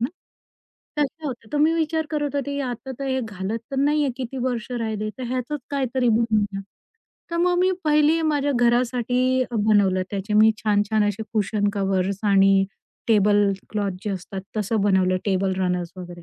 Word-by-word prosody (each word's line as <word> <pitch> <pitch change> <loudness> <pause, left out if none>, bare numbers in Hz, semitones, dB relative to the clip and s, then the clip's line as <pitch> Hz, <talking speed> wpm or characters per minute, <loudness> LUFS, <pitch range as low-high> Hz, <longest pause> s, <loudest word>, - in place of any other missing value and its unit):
ना 240 - +1 0.9
तशा 295 +2 -1
होत्या. 240 -5 -6
तर 295 - 0
मी 315 +2 +4
विचार 320 -1 0
करत 295 -2 -2
होती 280 0 -2
आता 255 0 -4
तर 275 - -4
हे 260 -1 0
घालत 210 -1 -4
तर 275 - -4
नाही 295 +2 +2
आहे, 275 - 0
किती 260 0 -5
वर्ष 245 -2 -2
राहिली. 220 -3 -2
तर - - -5
ह्याचच 255 +4 -2
काहीतरी 260 -3 0
बनवूनया. 215 -3 +1 0.7
तर 335 - -2
मग 355 +1 +2
मी 370 +1 +3
पहिली 305 +1 +3
माझ्या 290 -2 +1
घरासाठी 245 +1 +2
अ, 245 - -6
बनवलं. 205 -3 +3
त्याचे 200 +1 -4
मी 215 +1 +7
छान-छान 210 0 +1
असे 205 +2 -3
कुशन 210 -1 0
कव्हर्स 195 -1 0
आणि 195 -1 +5 0.4
टेबल 205 -2 +4 0.2
क्लॉथ 205 -2 -1
जे 210 - -1
असतात. 190 0 -5 0.2
तसं 215 +1 0
बनवलं 190 -2 +3
टेबल 195 -1 +1
रनर्स 180 -2 -1
वगैरे. 175 -1 -9
225 Hz, 170 wpm, -23 LUFS, 200-270 Hz, 0.9 s, मी